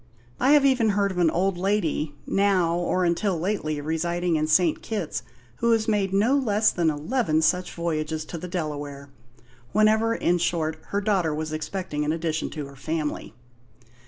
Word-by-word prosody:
I 265 +4 +4
have 290 -2 +5
even 255 -5 +3
heard 200 -1 +2
of 180 - -4
an 170 -2 +4
old 180 +2 0
lady, 175 -6 0
now 190 -4 +2
or 175 +1 0
until 175 +1 0
lately 160 -5 -2
residing 170 +3 -1
in 155 0 0
St. 165 0 +3
Kitts, 205 -8 -3 0.4
who 235 - +1
has 220 -1 +1
made 205 -3 +1
no 215 +8 +3
less 215 -6 +2
than 170 -2 +1
eleven 155 - 0
such 180 +3 +1
voyages 155 -2 -2
to 170 - -7
the 180 - -6
Delaware 145 -5 -5 0.6
whenever, 220 +2 +3
in 175 -4 +1
short, 160 -2 -1
her 200 - -1
daughter 190 -7 +1
was 155 0 -4
expecting 155 -1 -3
an 150 - 0
addition 160 -1 -2
to 150 -3 -6
her 140 0 -12
family." 150 -4 -4
175 Hz, 170 wpm, -25 LUFS, 155-200 Hz, 0.6 s, have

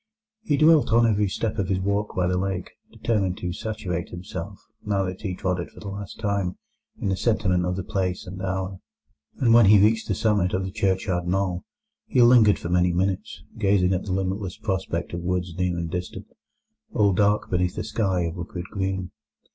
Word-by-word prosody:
He 175 -10 0
dwelt 155 -3 +5
on 115 +1 +5
every 105 -2 +2
step 110 +2 -2
of 95 - 0
his 95 -1 +1
walk 100 +2 -1
by 90 - +1
the 90 +1 +1
lake, 95 -1 -3 0.2
determined 100 -6 -1
to 90 -1 -3
saturate 90 -4 -4
himself, 90 +1 -7 0.3
now 100 -2 0
that 95 0 -5
he 95 -4 -3
trod 90 -1 -1
it 85 - -5
for - - -15
the 100 - -7
last 100 +1 -7
time, 100 -4 -1 0.4
in - - -1
the 95 - +1
sentiment 95 -4 +1
of 90 - -1
the 95 - -3
place 90 -1 -2
and 95 +1 -7
hour. 95 0 -3 0.6
And 115 -4 +3
when 115 -3 +7
he 105 +1 +8
reached 110 +3 +3
the - - 0
summit 105 -5 +1
of 95 - -1
the 95 - -5
churchyard 95 -3 0
knoll, 90 -1 -1 0.4
he - - +1
lingered 120 -4 +6
for 85 - -6
many 90 0 +3
minutes, 95 +4 -2 0.2
gazing 95 -3 +3
at 90 - -2
the 100 - -4
limitless 95 0 -2
prospect 95 -5 -3
of 85 - -3
woods 90 -1 -2
near 90 -1 0
and 85 -1 -3
distant, 90 0 -5 0.7
all 100 -2 +3
dark 105 +2 +2
beneath 90 0 0
a - - -2
sky 95 -5 0
of 85 0 -3
liquid 90 0 -6
green. 95 -2 -2
95 Hz, 200 wpm, -25 LUFS, 90-105 Hz, 0.7 s, he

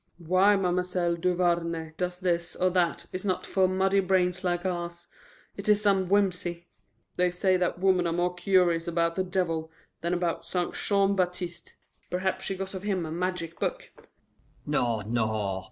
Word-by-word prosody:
Why 185 +4 +5
Ma'm'selle 180 -2 0
Duvarney 170 -2 0
does 180 +1 -2
this 175 -2 -1
or 185 0 +2
that 175 -2 +1
is 185 - -4
not 185 -3 -1
for 190 -1 +2
muddy 190 +1 +2
brains 185 -1 +1
like 175 0 -1
ours. 175 -1 -3 0.5
It 200 +1 -4
is 210 -1 +5
some 195 -3 +2
whimsy. 180 -3 0 0.5
They 180 0 +3
say 185 +1 +1
that 180 -1 0
women 180 -1 +3
are - - 0
more 175 +1 0
curious 175 -2 +2
about 170 0 +1
the 185 - 0
devil 165 -4 -1 0.3
than 170 +2 0
about 175 -1 -1
St. 180 -1 -1
Jean 200 -1 +2
Baptiste. 180 -2 -3 0.3
Perhaps 185 +1 -1
she 195 - -2
got 195 +1 -5
of 190 - -5
him 190 -4 -1
a 155 - -6
magic 170 -1 -3
book." - - -3 0.7
"No, 120 -7 0
no! 110 -3 -1
180 Hz, 165 wpm, -28 LUFS, 170-185 Hz, 0.7 s, Why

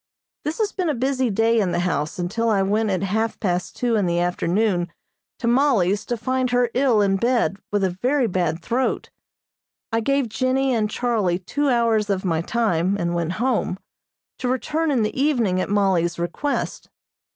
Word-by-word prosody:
This 300 +2 -3
has 425 -2 0
been 365 -4 -1
a 300 - 0
busy 260 0 0
day 225 +2 +2
in 190 -4 0
the - - +1
house 155 -4 -1
until 210 +6 -1
I 200 -3 +2
went 210 +3 +1
at 190 -1 -1
half 220 +3 -1
past 180 -3 -2
two 240 -2 0
in 205 -4 +1
the 170 0 +1
afternoon 175 +1 0 0.5
to - - -5
Mollie's 230 -7 +2
to 240 - -1
find 255 +2 -1
her 245 -1 +2
ill 250 -5 +3
in 195 -1 +2
bed 230 -5 +1
with 205 -1 +1
a 190 - +1
very 265 +1 +2
bad 175 -5 -1
throat. 255 +6 -1 0.8
I 225 - +1
gave 275 +2 +1
Jennie 260 +3 0
and 215 -3 +1
Charlie 220 -8 0
two 285 +10 -1
hours 230 -4 +2
of 195 -1 -1
my 165 -3 +1
time, 195 -3 0
and 170 -2 -1
went 170 0 -1
home, 235 -4 0 0.6
to 255 - -2
return 305 +6 0
in 255 -6 +2
the 215 +5 -2
evening 235 -11 +2
at - - -3
Mollie's 190 -4 +1
request. 175 +12 -3
220 Hz, 185 wpm, -22 LUFS, 185-250 Hz, 0.8 s, ill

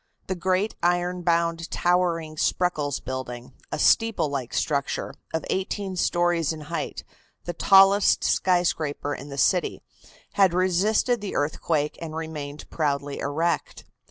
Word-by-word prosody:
The 190 - -2
great, 185 +3 0
iron 175 +1 +1
bound, 170 -1 0
towering 175 -3 0
Spreckles 155 -4 0
building, 125 -2 -6 0.2
a - - -2
steeple 225 -9 +3
like 135 -4 -4
structure, 140 -2 -1 0.2
of 160 - -2
eighteen 190 0 -2
stories 175 -2 +1
in 160 -1 -6
height, 150 - -5 0.4
the 175 - -3
tallest 195 +3 +5
skyscraper 160 -5 +1
in 140 +1 -8
the 140 - -7
city, 180 +6 +1 0.5
had 190 -3 +4
resisted 200 +6 +2
the 205 - -5
earthquake 150 0 -1
and 160 -2 -6
remained 150 -3 -6
proudly 145 -2 -1
erect. 165 +4 -2
170 Hz, 130 wpm, -25 LUFS, 145-185 Hz, 0.5 s, tallest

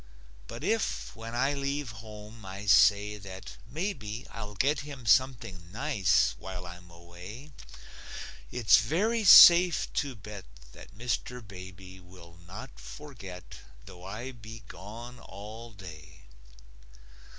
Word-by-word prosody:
But - - -8
if, - - -1
when 115 +1 -7
I 135 +4 +2
leave 140 -2 -2
home, 105 +1 -11
I 95 +2 -7
say 105 +1 +5
that 95 0 -10
maybe 130 - -4
I'll 105 -2 -7
get 140 +8 +2
him 140 -4 -8
something 110 -9 +1
nice 125 -4 +2
while 90 -1 -7
I'm 90 0 -11
away, 90 - -11 1.0
It's 115 -4 +5
very 205 - +1
safe 175 -2 +9
to 140 -3 -1
bet 105 0 -9 0.3
that 100 - -14
Mr. 120 0 -3
Baby 95 -1 -11
Will 90 -2 -15
not 120 +8 -10
forget, 115 -12 -10 0.3
though 90 0 -12
I 110 +7 -6
be 115 -1 -11
gone 120 +6 -10
all 110 +4 -10
day. 80 -6 -12
105 Hz, 120 wpm, -29 LUFS, 95-125 Hz, 1.0 s, safe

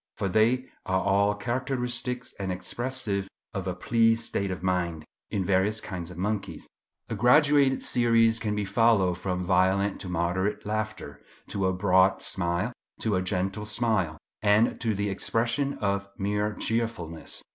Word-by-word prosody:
For 100 - -1
they 115 +6 +2 0.2
are 95 0 +2
all 100 +2 +2
characteristic 125 +1 -2 0.2
and 95 -2 -2
expressive 100 +2 -1 0.3
of 95 -3 -4
a 90 - -2
pleased 115 +4 +2
state 100 -3 0
of 90 -1 -5
mind 85 -4 -1 0.2
in 95 -3 -1
various 100 +3 +2
kinds 90 -4 -6
of 90 - -10
monkeys. 100 -3 -3 0.4
A - - -4
graduated 140 +1 +4
series 115 -2 +3
can 105 -1 -2
be 105 -1 -1
followed 100 -4 +3
from 90 -1 -2
violent 95 +2 +2
to 95 - -6
moderate 90 +3 -1
laughter, 110 +1 -4 0.3
to 95 -2 0
a 95 - +1
broad 95 0 +3
smile, 85 +6 0 0.3
to 110 -3 +1
a 95 - +1
gentle 95 +2 -2
smile, 105 -8 0 0.2
and 105 +2 +3
to 110 -3 0
the 100 0 -1
expression 120 +8 0
of 100 -1 -2
mere 105 +1 -1
cheerfulness. 110 -9 -3
100 Hz, 150 wpm, -27 LUFS, 95-115 Hz, 0.4 s, graduated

